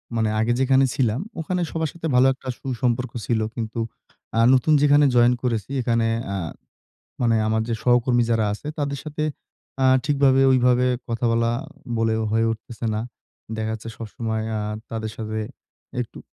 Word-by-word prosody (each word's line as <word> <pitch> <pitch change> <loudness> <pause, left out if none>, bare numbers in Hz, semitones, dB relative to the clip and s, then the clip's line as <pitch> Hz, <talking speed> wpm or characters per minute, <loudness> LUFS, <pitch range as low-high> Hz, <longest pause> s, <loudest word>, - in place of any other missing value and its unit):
মানে 110 -1 +1
আগে 115 +2 +2
যেখানে 135 0 +4
ছিলাম, 120 -2 +1 0.2
ওখানে 180 +3 -1
সবার 160 -2 -1
সাথে 165 -1 -4
ভালো 130 +1 +6
একটা 130 0 -14
সুসম্পর্ক 125 -1 -1
ছিল। 115 -2 +1 0.2
কিন্তু 115 0 -4 0.6
আ - - +4
নতুন 130 +4 +3
যেখানে 145 0 +5
জয়েন 120 +1 +6
করেছি, 115 +1 -1
এখানে 115 -1 +1 0.3
আ - - -1 0.9
মানে 115 -2 +3
আমার 110 0 +1
যে 115 - 0
সহকর্মী 120 0 +3
যারা 110 -2 +2
আছে, 110 - -8
তাদের 140 -1 -2
সাথে, 155 0 -3 0.6
আ - - +4 0.2
ঠিকভাবে 140 -2 +3
ওইভাবে 125 -1 +4 0.2
কথা 115 +1 -2
বলা 115 0 +2 0.5
বলে 115 0 +2 0.2
হয়ে 115 +1 +2
উঠতেছে 115 +1 -7
না। 110 - -1 0.6
দেখা 110 0 -2
যাচ্ছে 110 +1 -6
সবসময় 110 0 -4
আ - - -1 0.3
তাদের 110 -1 -3
সাথে 110 -1 -4 0.6
একটু 120 - -6
120 Hz, 160 wpm, -23 LUFS, 115-135 Hz, 0.9 s, ভালো